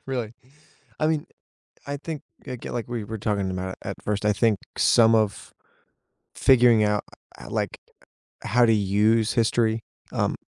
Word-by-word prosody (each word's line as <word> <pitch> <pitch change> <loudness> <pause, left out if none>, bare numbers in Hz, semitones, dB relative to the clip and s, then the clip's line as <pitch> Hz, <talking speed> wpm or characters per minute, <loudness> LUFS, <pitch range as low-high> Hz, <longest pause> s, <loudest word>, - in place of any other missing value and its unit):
Really. 125 -5 -3 0.7
I 155 - +1
mean, 155 -1 0 0.6
I 140 0 -3
think 155 0 -6 0.2
I 130 -2 -5
get 115 - -8
like 120 -1 -3
we 120 -3 -4
were 110 +2 -6
talking 100 -2 -1
about 95 0 -4
it - - -9
at - - -4
first. 105 0 -2
I 105 - +4
think 105 0 +2 0.2
some 115 -1 +5
of 110 -2 0 0.8
figuring 120 -4 +5
out 105 0 +1 0.4
I - - -10
I - - -10
like - - -2 0.6
how 120 +1 +3
to 115 - +4
use 105 +2 +2
history, 115 0 +1 0.3
um, - - 0
110 Hz, 165 wpm, -24 LUFS, 105-120 Hz, 0.8 s, some